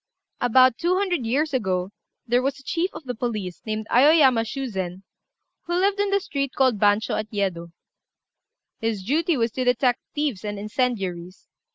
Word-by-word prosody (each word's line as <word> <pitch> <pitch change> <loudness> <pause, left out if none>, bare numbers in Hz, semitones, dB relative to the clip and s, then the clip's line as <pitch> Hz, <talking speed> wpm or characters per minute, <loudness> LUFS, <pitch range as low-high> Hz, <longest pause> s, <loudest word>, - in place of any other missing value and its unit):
About 255 0 +4
two 350 +2 +1
hundred 360 - 0
years 285 +5 0
ago 190 -6 -1 0.3
there 245 +1 +2
was 275 +2 -2
a - - -16
chief 340 +6 -1
of - - -10
the 250 -2 -4
police, 215 -7 -4
named 215 0 -2
Aoyama 265 -2 +5
Shuzen, 195 -8 -4 0.6
who 345 - -1
lived 395 +2 +1
in 405 0 +1
the 400 0 +2
street 280 -8 -3
called 255 -6 +2
Bancho, 205 +1 +2
at 215 0 -5
Yedo. 185 -5 -2 1.1
His 225 -4 -2
duty 315 - +1
was 230 -1 0
to 255 - -2
detect 250 0 +2 0.2
thieves 290 -10 -2
and 205 -1 -4
incendiaries. 195 -5 -3
245 Hz, 165 wpm, -24 LUFS, 205-285 Hz, 1.1 s, Aoyama